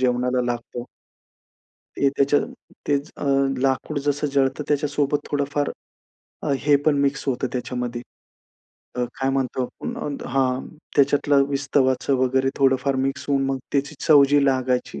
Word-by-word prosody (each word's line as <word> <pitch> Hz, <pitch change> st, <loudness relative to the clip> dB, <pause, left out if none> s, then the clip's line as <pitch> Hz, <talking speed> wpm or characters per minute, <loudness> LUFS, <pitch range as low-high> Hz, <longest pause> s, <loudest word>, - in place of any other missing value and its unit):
जेवणाला 125 Hz, 0 st, +1 dB
लागतो. 120 Hz, 0 st, -7 dB, 1.1 s
ते 140 Hz, -, +3 dB
त्याच्या 140 Hz, +1 st, +3 dB, 0.5 s
तेच 145 Hz, +1 st, 0 dB
अ, -, -, -6 dB, 0.4 s
लाकूड 135 Hz, +2 st, 0 dB
जसं 145 Hz, +1 st, +1 dB
जळतं 135 Hz, +1 st, +1 dB
त्याच्यासोबत 145 Hz, 0 st, +1 dB
थोडंफार 145 Hz, 0 st, -1 dB, 0.7 s
अ, 150 Hz, -, 0 dB
हे 145 Hz, 0 st, +4 dB
पण 150 Hz, -2 st, +3 dB
मिक्स 140 Hz, 0 st, 0 dB
होतं 130 Hz, 0 st, 0 dB
त्याच्यामध्ये 125 Hz, -1 st, -3 dB, 1.0 s
अ, 125 Hz, -, +1 dB, 0.2 s
काय 135 Hz, 0 st, +1 dB
म्हणतो, 130 Hz, -1 st, -1 dB, 0.2 s
अ, 235 Hz, -, -4 dB
हां, 130 Hz, -1 st, 0 dB, 0.3 s
त्याच्यातलं 140 Hz, 0 st, +4 dB
विस्तवाचं 135 Hz, -1 st, +1 dB
वगैरे 130 Hz, +1 st, +2 dB
थोडंफार 135 Hz, 0 st, +2 dB
मिक्स 135 Hz, +1 st, -1 dB
होऊन 135 Hz, -1 st, +2 dB
मग 135 Hz, 0 st, -1 dB
त्याची 145 Hz, +2 st, 0 dB
चव 145 Hz, -3 st, +8 dB
जी 145 Hz, 0 st, +4 dB
लागायची. 130 Hz, -, 0 dB
135 Hz, 130 wpm, -23 LUFS, 130-145 Hz, 1.1 s, चव